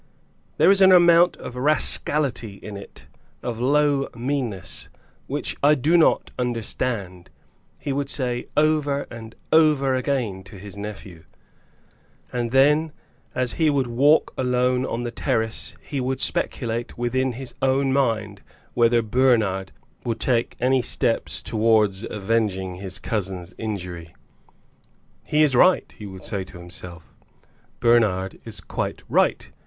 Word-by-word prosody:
"There - - +6
is 195 0 +3
an 190 0 +8
amount 175 -1 +6
of 125 - -8
rascality 140 -4 +1
in 105 +1 -9
it, 100 - -12 0.4
of 115 -2 -4
low 140 +2 +2
meanness, 120 -5 -3 0.4
which - - -2
I 150 +2 +5
do 150 +5 +2
not 165 - +3
understand," 115 -6 -3 0.5
he 140 -1 -4
would 140 0 -2
say 125 -4 -2
over 150 -2 +2
and 115 -1 -10 0.2
over 150 -4 +4
again 125 -8 -1
to 100 - -12
his 100 +1 -9
nephew. 100 -5 -8 1.1
And 120 -1 -1
then 150 +5 +3 0.4
as 125 -1 -1
he 155 - +5
would 140 -3 +1
walk 135 +6 +3
alone 125 0 +1
on 120 +1 -3
the 120 - -3
terrace 110 -1 -2
he 140 -3 -4
would 130 +1 -2
speculate 120 -3 -2
within 130 +2 0
his 130 +1 -7
own 135 0 +2
mind 110 -7 0 0.3
whether 120 0 +3
Bernard 110 -5 +1 0.3
would 115 -1 -3
take 120 -2 0
any 130 +1 +2
steps - - 0
towards 110 -3 +2
avenging 95 -3 -1
his 95 0 -3
cousin's 95 -5 -4
injury. 90 -6 -6 1.1
"He 150 +1 +2
is 140 -4 +2
right," 185 +9 +4
he 105 - -9
would 95 -1 -10
say 100 -2 -3
to 90 - -12
himself; 85 -1 -10 0.7
"Bernard 105 -6 +2
is - - -6
quite - - -4
right. - - +1
120 Hz, 135 wpm, -23 LUFS, 105-135 Hz, 1.1 s, an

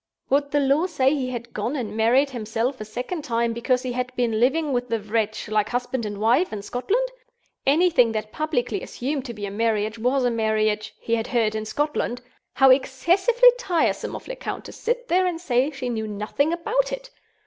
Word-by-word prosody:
Would 285 +1 +2
the 290 - +2
law 285 +5 +2
say 270 -5 +2
he 265 -4 -1
had 235 -1 -6
gone 255 - -2
and 220 -6 -4
married 250 +6 +3
himself 230 +2 -2
a - - -4
second 250 - -5
time, 235 -3 0
because 250 +2 0
he 255 - -2
had 250 +1 -2
been 230 -3 0
living 275 +4 +2
with 245 0 -1
the 230 -1 0
Wretch, 215 +1 -2
like 210 0 +1
husband 245 -1 -2
and 205 -1 -6
wife, 235 - +3
in 210 -2 -5
Scotland? 405 - 0 0.6
Anything 300 -5 +4
that 215 -1 -3
publicly 305 -6 -1
assumed 270 +1 -4
to 240 - -5
be 205 -1 -5
a 200 - -5
marriage 220 0 0
was 250 +3 +1
a 245 - +2
marriage 215 -1 0
(he 230 - -3
had 225 -1 0
heard) 230 -4 +1
in 215 0 -3
Scotland. 290 -1 -1 0.3
How 270 -1 +6
excessively 370 - +4
tiresome 360 -10 0
of - - -9
Lecount - - -5
to - - -8
sit 485 +1 -2
there 370 -1 +3
and 345 -2 -2
say 260 -4 +1
she 270 -4 -5
knew 220 -3 -2
nothing 215 +9 -1
about 455 +9 0
it! - - -6
250 Hz, 200 wpm, -24 LUFS, 225-300 Hz, 0.6 s, How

